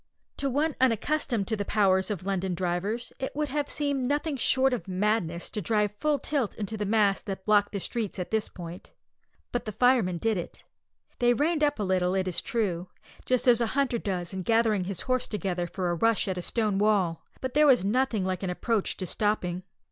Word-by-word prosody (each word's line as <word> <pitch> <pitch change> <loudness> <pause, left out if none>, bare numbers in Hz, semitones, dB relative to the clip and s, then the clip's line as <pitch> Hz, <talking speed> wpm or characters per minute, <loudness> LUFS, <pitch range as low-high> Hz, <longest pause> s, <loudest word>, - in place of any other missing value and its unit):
To 275 - 0
one 295 +4 0
unaccustomed 245 -2 +1
to 220 - +1
the 205 - -2
powers 195 -2 +2
of 190 -4 -4
London 190 -2 -1
drivers, 190 +7 -2
it 265 - -4
would 300 0 -1
have 290 +1 -1
seemed 280 -4 -1
nothing 290 +2 0
short 265 +1 +3
of 235 - -3
madness 185 -3 -1
to 210 - -3
drive 210 +1 +1
full 300 -1 +2
tilt 275 -4 -2
into 215 +1 -4
the 210 -1 -2
mass 205 -2 +3
that 190 -2 -6
blocked 205 -1 +3
the 200 - -3
streets 220 +1 -3
at 180 - -4
this 220 -1 0
point. 175 0 -9 0.6
But 245 - -2
the 215 - -3
firemen 230 -6 +3
did 220 +3 0
it. 175 - -7 0.6
They 240 -1 +4
reined 305 +3 +1
up 290 -1 +2
a 210 - -2
little, 185 -1 +1
it 190 -1 0
is 180 - -1
true, 185 -6 -2 0.4
just 255 0 +1
as 240 -1 +6
a 235 - +2
hunter 260 -4 +1
does 185 -4 -3
in 190 - -3
gathering 220 -2 +2
his 190 -2 -5
horse 255 -1 0
together 185 -4 -2
for 180 0 -2
a - - 0
rush 225 +4 +2
at 190 - -1
a - - -3
stone 210 0 0
wall, 200 -6 +2 0.2
but 260 -1 -4
there 300 +1 +5
was 250 -8 +5
nothing 225 -2 +1
like 185 -1 -2
an 190 - -2
approach 210 +3 0
to 185 - -4
stopping. 185 -2 -1
210 Hz, 210 wpm, -27 LUFS, 185-250 Hz, 0.6 s, as